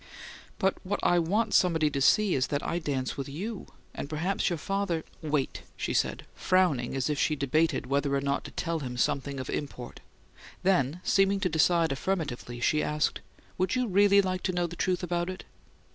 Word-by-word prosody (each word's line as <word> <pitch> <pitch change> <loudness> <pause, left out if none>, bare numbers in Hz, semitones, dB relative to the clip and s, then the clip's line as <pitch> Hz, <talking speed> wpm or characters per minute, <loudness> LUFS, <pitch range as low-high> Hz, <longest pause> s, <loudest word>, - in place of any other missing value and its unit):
"But 190 0 +1
what 200 +2 -2
I 175 - +4
want 210 +6 0
somebody 160 -4 +3
to 140 - -2
see 205 +7 +4
is 130 0 +1
that 145 0 -2
I 170 - -1
dance 135 -5 -2
with 135 0 -4
you! 195 +9 -5 0.3
And 140 - -6
perhaps 175 +7 0
your 175 - -1
father 195 -2 -2
" - - -28
"Wait!" 150 -4 -1 0.2
she - - -2
said, - - 0
frowning 175 -10 +1
as 135 -2 0
if 150 -2 -1
she 155 - +2
debated 150 +2 +1
whether 140 +1 0
or - - +2
not 140 0 -1
to - - -8
tell 165 -1 -2
him 125 -4 -5
something 140 +2 0
of 130 - -5
import; 125 -4 -5 0.6
then, 180 -3 +2
seeming 195 0 +3
to 180 - +1
decide 165 0 +3
affirmatively, 135 -6 -3
she 150 +5 +2
asked: 150 0 0 0.4
"Would 185 +5 +1
you 250 0 +1
really 200 0 +5
like 185 -1 -2
to - - 0
know 175 -1 0
the 175 0 -6
truth 185 0 0
about 175 0 -1
it?" 185 - -6
165 Hz, 195 wpm, -28 LUFS, 140-185 Hz, 0.6 s, really